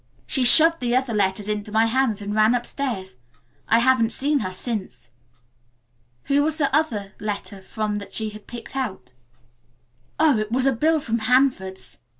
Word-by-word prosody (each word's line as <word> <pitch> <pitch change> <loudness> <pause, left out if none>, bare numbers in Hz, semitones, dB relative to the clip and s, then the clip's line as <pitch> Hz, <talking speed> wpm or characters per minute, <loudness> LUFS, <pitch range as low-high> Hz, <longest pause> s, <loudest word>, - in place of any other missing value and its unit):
She 265 - -1
shoved 325 +6 +7
the 245 -1 -1
other 255 -2 0
letters 200 0 -1
into 210 0 -3
my 220 +1 +3
hands 225 -3 0
and 205 +1 -4
ran 215 +3 +3
upstairs. 235 - -4 0.5
I 225 - +4
haven't 240 -1 +3
seen 285 +5 0
her 185 - -4
since." 185 - -6 1.1
"Who 280 +1 +1
was 310 +1 +1
the 280 -3 +1
other 210 -11 -1
letter 205 -1 -6
from 210 +1 -4
that 200 - -8
she 220 -1 -1
had 210 -1 -13
picked 240 +2 -10
out?" 190 - -5 1.1
"Oh, 305 -7 +4
it 215 0 -4
was 255 +2 +1
a 270 - +4
bill 310 +6 +1
from 230 -3 -2
Hanford's. 205 - 0
225 Hz, 165 wpm, -22 LUFS, 205-265 Hz, 1.1 s, shoved